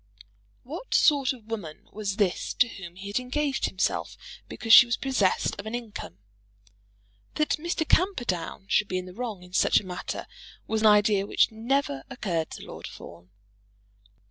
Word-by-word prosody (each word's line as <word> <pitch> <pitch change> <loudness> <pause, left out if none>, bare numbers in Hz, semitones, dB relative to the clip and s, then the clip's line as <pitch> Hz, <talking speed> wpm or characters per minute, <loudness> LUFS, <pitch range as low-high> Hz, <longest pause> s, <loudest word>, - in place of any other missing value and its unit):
What - - -5
sort 285 -3 +4
of 245 -5 -10
woman 205 -9 -7
was 200 -2 -3
this 200 -4 0
to 245 - +4
whom 185 -6 -10
he 190 +2 -10
had 200 +4 -1
engaged 275 +2 -1
himself 190 - -2 0.3
because 225 -1 +1
she 240 - +11
was 235 - 0
possessed 245 -9 +1
of 200 - -6
an 225 - -3
income? 225 - -7 1.2
That 305 +1 +1
Mr. 330 -1 -2
Camperdown 240 - 0
should 210 - +2
be 185 - -2
in 180 - -4
the 180 - -10
wrong 220 -4 -5
in 180 0 -16
such - - +4
a - - -12
matter 180 -1 -5 0.4
was 220 0 -1
an 220 - +6
idea 210 -1 +4
which - - +3
never 225 - -1
occurred 180 -11 -2
to - - -8
Lord - - -8
Fawn. 85 +1 -12
215 Hz, 170 wpm, -27 LUFS, 185-250 Hz, 1.2 s, she